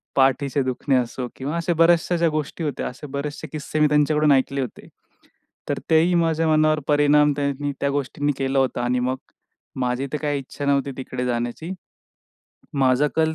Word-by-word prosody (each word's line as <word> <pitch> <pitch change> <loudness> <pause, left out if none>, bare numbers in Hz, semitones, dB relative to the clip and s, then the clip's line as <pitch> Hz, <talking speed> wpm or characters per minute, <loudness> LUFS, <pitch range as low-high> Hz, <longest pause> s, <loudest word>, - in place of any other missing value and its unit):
पाठीचे 135 +1 +2
दुखणे 130 +1 0
असो 125 0 -1
किंवा 145 +5 -3
असे 170 +1 0
बऱ्याचशा 170 +1 +3
ज्या 165 -1 +3
गोष्टी 155 +1 -3
होत्या 145 -3 -2
असे 145 +4 -8
बरेचसे 145 +2 -4
किस्से 155 0 -4
मी 150 - +5
त्यांच्याकडून 150 0 +3
ऐकले 135 0 +2
होते. 125 - -7 0.8
तर - - -1
तेही 165 +3 +4
माझ्या 165 -1 +2
मनावर 155 0 +3
परिणाम 150 0 +4
त्यांनी 140 0 -1
त्या 140 - +1
गोष्टींनी 145 +1 -1
केला 135 0 0
होता 130 -2 0
आणि 125 +1 +1
मग 130 +1 -1 0.6
माझी 125 +2 -1
तर - - +1
काही 145 -2 0
इच्छा 140 +2 -7
नव्हती 140 0 +1
तिकडे 130 -1 -4
जाण्याची. 120 +6 -3 1.0
माझा 135 +1 +3
कल 160 0 +2
145 Hz, 165 wpm, -23 LUFS, 130-155 Hz, 1.0 s, मी